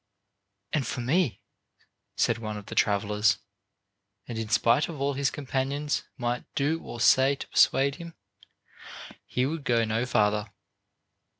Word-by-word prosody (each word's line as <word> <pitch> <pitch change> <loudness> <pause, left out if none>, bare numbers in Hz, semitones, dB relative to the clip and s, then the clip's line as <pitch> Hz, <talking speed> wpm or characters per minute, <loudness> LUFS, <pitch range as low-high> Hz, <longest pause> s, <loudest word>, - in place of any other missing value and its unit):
"And 140 -6 0
for 125 - -3
me," 140 +3 +1 0.7
said 115 0 +1
one 110 -2 -5
of 105 - -9
the - - -8
travelers; 105 +1 +2 0.9
and 120 - -5
in 110 -1 -4
spite 115 +7 +3
of 155 -4 -7
all 140 +1 0
his 140 0 +1
companions 140 +1 -2 0.2
might 120 -1 -2
do 155 +4 0
or 120 - -8
say 135 +3 +5
to - - -8
persuade 140 +1 +3
him, 170 -1 -10 1.1
he 125 - 0
would 155 +2 -3
go 115 -3 +2
no 110 +3 -1
farther. 105 -1 +1
125 Hz, 140 wpm, -27 LUFS, 110-140 Hz, 1.1 s, say